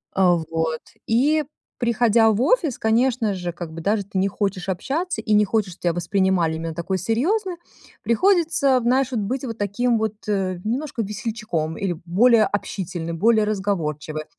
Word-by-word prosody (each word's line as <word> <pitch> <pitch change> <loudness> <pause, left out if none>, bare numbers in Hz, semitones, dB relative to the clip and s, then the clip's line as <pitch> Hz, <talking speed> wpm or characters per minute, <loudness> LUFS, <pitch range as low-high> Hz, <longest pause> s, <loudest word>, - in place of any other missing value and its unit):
Э, 190 - +1 0.3
вот. 160 -1 -1 0.3
И 295 +7 +3 0.4
приходя 235 -2 +3
в 210 - 0
офис, 315 - +2
конечно 225 -1 +2
же, 180 -1 -4
как 170 -2 -8
бы 165 - -7
даже 205 +2 +1
ты 195 - -5
не 195 +1 +2
хочешь 195 -2 -2
общаться, 310 - -2
и 215 - 0
не 210 0 +5
хочешь, 200 -3 -1
что - - -21
тя 175 -2 +1
воспринимали 175 -2 +1
именно 165 0 -4
такой 180 +3 -2
серьезной, 345 - 0 0.5
приходится, 330 - +3
вот, 250 - +1
знаешь, 260 +2 +2
быть 245 +4 -2 0.2
таким 225 +4 +1
вот 220 -1 -1
немножко 215 +7 -2
весельчаком 210 -7 -3
или 190 -3 -1
более 220 +5 +5
общительным, 175 -4 -4
более 220 +2 +4
разговорчивой. 160 -7 -2
А - - -27
210 Hz, 160 wpm, -22 LUFS, 180-245 Hz, 0.5 s, не